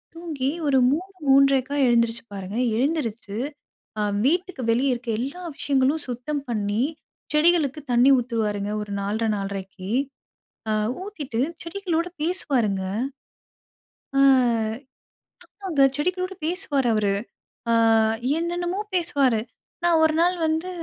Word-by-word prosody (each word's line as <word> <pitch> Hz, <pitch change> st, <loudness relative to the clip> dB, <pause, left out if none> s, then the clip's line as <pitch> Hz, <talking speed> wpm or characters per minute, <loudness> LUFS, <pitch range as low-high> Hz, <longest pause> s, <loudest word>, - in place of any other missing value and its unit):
தூங்கி 310 Hz, -6 st, -3 dB, 0.2 s
ஒரு 275 Hz, -2 st, +4 dB
3:00 365 Hz, +7 st, -2 dB, 0.2 s
3:30க்கா 275 Hz, 0 st, +4 dB
எழுந்திரிச்சுப்பாருங்க. 230 Hz, -4 st, -1 dB, 0.2 s
எழுந்திருச்சு 235 Hz, -7 st, -1 dB, 0.6 s
அ -, -, +1 dB, 0.2 s
வீட்டுக்கு 350 Hz, -1 st, 0 dB
வெளியே 260 Hz, +4 st, +2 dB
இருக்குற 240 Hz, -1 st, -3 dB
எல்லா 280 Hz, +8 st, -5 dB, 0.2 s
விஷயங்களும் 280 Hz, +2 st, +1 dB
சுத்தம் 255 Hz, +4 st, -3 dB
பண்ணி, 210 Hz, 0 st, 0 dB, 0.5 s
செடிகளுக்கு 305 Hz, -2 st, +3 dB
தண்ணீர் 250 Hz, +3 st, +6 dB
ஊத்துருவாருங்க. 215 Hz, -4 st, -2 dB
ஒரு 205 Hz, -, -9 dB
4:30 215 Hz, +3 st, -1 dB
4:30ககு, 195 Hz, -1 st, -6 dB, 0.8 s
அ -, -, +2 dB, 0.3 s
ஊத்திட்டு 295 Hz, -, -4 dB, 0.2 s
செடிகளோடு 340 Hz, -1 st, -2 dB
பேசுவாருங்க. 250 Hz, -, 0 dB, 1.3 s
அ -, -, +5 dB, 1.5 s
ஆமாங்க. 320 Hz, -7 st, +2 dB
செடிகளோடு 365 Hz, +4 st, -1 dB
பேசுவாரு 310 Hz, -6 st, 0 dB
அவரு. 210 Hz, -2 st, +2 dB, 0.6 s
அ -, -, +4 dB, 0.6 s
என்னென்னமோ 350 Hz, +2 st, -2 dB, 0.2 s
பேசுவாரு. 280 Hz, -10 st, +2 dB, 0.4 s
நான் 340 Hz, -2 st, +4 dB
ஒரு 315 Hz, 0 st, +4 dB
நாள் 355 Hz, +1 st, +3 dB
வந்து 320 Hz, +3 st, 0 dB
275 Hz, 105 wpm, -24 LUFS, 230-335 Hz, 1.5 s, தண்ணீர்